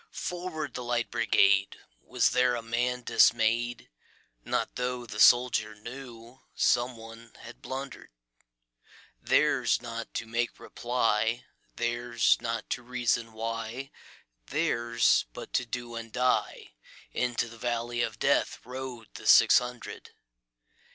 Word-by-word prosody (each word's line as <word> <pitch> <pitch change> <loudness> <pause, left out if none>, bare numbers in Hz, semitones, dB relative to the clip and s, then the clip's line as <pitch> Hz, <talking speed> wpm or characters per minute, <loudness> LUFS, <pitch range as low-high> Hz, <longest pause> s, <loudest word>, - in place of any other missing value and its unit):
"Forward, 175 -4 -4
the 125 - -5
Light 120 -1 -1
Brigade!"Was 100 - +1
there 125 0 +3
a 115 - -5
man 120 +2 -1
dismay'd? 120 +1 +2 0.6
Not - - -2
tho' 125 0 -3
the 105 -2 -8
soldier 115 -2 +5
knewSome 120 +1 -3
one 115 0 -12
had 120 - -12
blunder'd:Theirs - - -3
not 115 -1 -6
to - - -2
make 115 +1 -2
reply, 120 -1 -1 0.3
Theirs 120 -1 +1
not 115 0 -3
to 125 - -1
reason 120 -2 -1
why, 115 +4 -5 0.6
Theirs 115 - +2
but - - -9
to 125 - 0
do 120 0 -5
and 115 -1 -7
die:Into 120 - -2
the 115 0 -13
valley 120 0 -2
of - - -2
DeathRode 125 -2 -1
the - - -8
six - - +8
hundred. 125 0 -8
120 Hz, 110 wpm, -28 LUFS, 115-125 Hz, 0.6 s, six